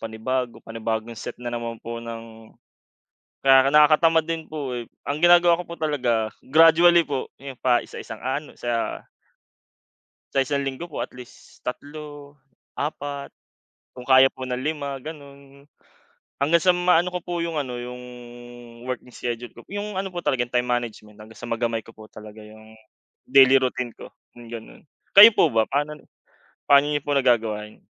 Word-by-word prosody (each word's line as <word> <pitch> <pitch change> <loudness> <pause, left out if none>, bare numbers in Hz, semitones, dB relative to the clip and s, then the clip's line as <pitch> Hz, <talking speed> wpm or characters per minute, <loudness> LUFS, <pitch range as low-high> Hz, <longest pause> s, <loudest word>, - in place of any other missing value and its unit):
panibago, 120 +2 -3
panibagong 115 0 -4
set - - -6
na 120 0 -6
naman 115 -1 -4
po 115 0 -5
ng 115 -1 -10 0.9
kaya 135 0 +6
nakakatamad 155 +2 +5
din 165 -1 -5
po, 145 -5 -5
eh, 120 -2 -6 0.2
ang 145 +2 -3
ginagawa 175 0 +5
ko - - -9
po 170 - -6
talaga 120 -8 0 0.2
gradually 165 +3 +6
po, 140 -4 -4 0.2
'yon 135 -3 -9
pa 125 -2 +2
isa-isang 110 - -9
ano 140 +4 -4
sa 120 -1 -3 1.3
Sa 135 - +4
1 140 +2 -1
isang 140 - -3
linggo 135 +6 -5
po - - -7
at - - -5
least 125 -1 -15
3, 145 +2 -8 0.4
4, 145 -1 -5 0.6
kung 125 - -9
kaya 130 +1 +6
po 130 - -6
ng 125 -1 -3
5 140 0 -3
gano'n. 140 -1 -12 0.8
Hanggang 170 +4 +4
sa 180 +1 +3
maano 180 -1 +3
ko 180 -1 -4
po 175 -1 -4
'yong 170 -1 -3
ano, 130 -5 -3
'yong 125 +1 -8 0.8
working 125 -1 -5
schedule 120 0 -5
ko 120 - -13
p 205 - -6
'yong 210 0 -5
ano 190 0 -3
po 175 - -5
talaga 130 -7 0 0.2
time 125 - -3
management 115 -4 -3
hanggang 110 +1 -15
sa 120 - -8
magamay 115 -1 -1
ko 115 0 -15
po 110 -1 -14
talaga 110 0 -12
'yong 110 +1 -15 0.5
daily 135 0 +7
routine 125 -2 -2
ko, - - -12 0.3
yung 120 - -12
gano'n. 115 -1 -10 0.3
Kayo 210 +3 +10
po - - +4
ba 110 -1 +2
panon 150 +3 -2 0.7
paano 140 +1 +7
niyo 145 -1 -1
po 145 - -3
nagagawa 115 -6 +1
yon? 105 - -20
130 Hz, 165 wpm, -23 LUFS, 115-150 Hz, 1.3 s, Kayo